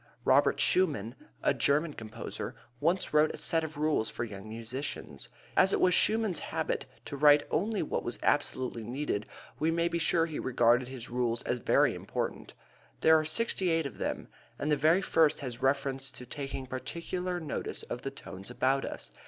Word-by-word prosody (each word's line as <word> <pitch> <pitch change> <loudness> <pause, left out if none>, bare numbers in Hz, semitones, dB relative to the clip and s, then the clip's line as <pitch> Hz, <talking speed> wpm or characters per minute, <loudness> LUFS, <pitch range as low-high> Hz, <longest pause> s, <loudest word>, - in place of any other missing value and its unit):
Robert - - +4
Schumann, 145 - +2 0.3
a - - +4
German 150 +2 +1
composer, 110 -3 -6 0.2
once 170 +5 0
wrote 150 +1 +5
a - - -10
set 165 -1 +2
of 155 -1 -6
rules 150 -7 +1
for - - -4
young 105 -2 -8
musicians. 115 +6 -6 0.3
As 190 +1 +4
it - - +2
was 180 - +4
Schumann's 215 -4 +2
habit - - -2 0.2
to - - -6
write 145 +1 +6
only 210 +1 0
what - - -2
was 120 - -3
absolutely 130 -5 0
needed 120 -3 -3 0.3
we 155 - +2
may 170 +1 +1
be 170 0 -1
sure 165 0 +2
he 160 -2 -5
regarded 120 0 +3
his 125 -2 -8
rules 120 -1 0
as 125 - -1
very - - +3
important. - - -4 0.5
There 160 - +7
are - - -1
sixty 185 +2 +2
eight 165 -1 +1
of 140 - -7
them, - - -3 0.3
and 150 - -1
the - - +5
very 160 +6 +3
first 160 -3 +3
has 125 -2 -5
reference 135 0 +1
to 125 - -8
taking 135 0 -5
particular 175 +7 -4
notice 160 -3 -4
of 120 - -6
the 135 - -3
tones 95 -7 -9
about 135 +2 +1
us. - - -7
145 Hz, 180 wpm, -30 LUFS, 125-165 Hz, 0.5 s, There